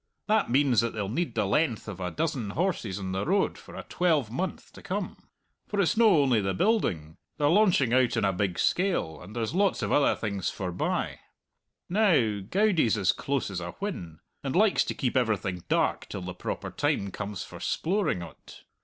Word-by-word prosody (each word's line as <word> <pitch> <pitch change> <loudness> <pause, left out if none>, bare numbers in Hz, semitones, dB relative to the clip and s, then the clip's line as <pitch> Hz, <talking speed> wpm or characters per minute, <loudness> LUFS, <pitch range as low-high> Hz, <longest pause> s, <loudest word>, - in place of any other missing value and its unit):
That 215 - +2
means 130 -2 +4
that 115 0 -2
they'll 105 -2 -2
need 125 +1 -2
the 105 -2 +1
length 115 +2 0
of 105 -3 -6
a 90 -1 -2
dozen 140 - -2
horses 140 - -1
on 95 -2 -4
the 95 +1 -1
road 195 +4 +1
for - - -13
a - - -6
twelvemonth 160 - -1
to - - -12
come; - - -3 0.5
for 205 - -2
it's 185 - +2
no 215 -10 +5
only 125 -5 +3
the 95 -1 -1
building 90 - 0 0.2
they're 145 - +2
launching 175 - +4
out 125 -2 +3
on 110 - +2
a 95 - +2
big 90 -1 -1
scale, 180 - 0
and 100 +6 -11
there's 115 +2 -2
lots 195 +1 +1
of - - -1
other 145 - +4
things 100 -4 -2
forbye. 90 -2 -2 0.7
Now, 170 - +3
Goudie's 165 - +2
as 95 -3 +3
close 135 -7 -2
as 95 - -3
a 85 0 -6
whin, 90 - -6 0.2
and 135 +2 -2
likes 210 +2 +4
to - - -3
keep 130 -2 -1
everything 105 -7 0
dark - - +1
till 95 - -5
the 90 0 -5
proper - - -5
time 100 -1 -1
comes 105 0 -5
for - - -11
sploring 180 - 0
o't. - - -15
120 Hz, 190 wpm, -28 LUFS, -, 0.7 s, no